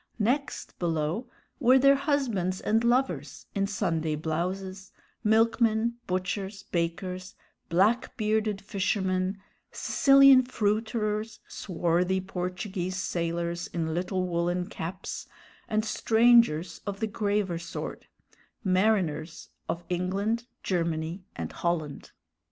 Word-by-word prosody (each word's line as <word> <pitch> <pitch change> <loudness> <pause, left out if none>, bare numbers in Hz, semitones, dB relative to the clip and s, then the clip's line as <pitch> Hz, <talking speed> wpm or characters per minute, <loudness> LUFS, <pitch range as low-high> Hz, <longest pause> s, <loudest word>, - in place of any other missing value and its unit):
Next 250 +6 -1
below 165 - -1 0.3
were 255 -1 +6
their 275 +1 +6
husbands 260 - 0
and 225 +2 +1
lovers 185 - 0
in 195 0 0
Sunday 160 -6 -1
blouses, 185 +5 -3 0.3
milkmen, 225 +1 +3
butchers, 190 +2 -2
bakers, 180 +2 -3 0.3
black 205 +8 +2
bearded 215 -2 0
fishermen, 190 -1 0 0.3
Sicilian 275 -1 +6
fruiterers, 215 -2 -1
swarthy 180 0 0
Portuguese 185 0 -4
sailors 170 -1 -2
in 160 -2 -2
little 185 +2 -1
woolen 175 +1 0
caps, 180 +2 -6 0.4
and 215 0 +1
strangers 220 -8 +4
of 200 -1 -3
the 220 - +1
graver 205 -5 -1
sort; 170 -1 -6 0.6
mariners 185 -5 +1 0.2
of 170 - -2
England, 200 +6 -1 0.2
Germany, 170 0 -1
and - - -4
Holland. 160 -4 -2
190 Hz, 100 wpm, -28 LUFS, 175-220 Hz, 0.6 s, were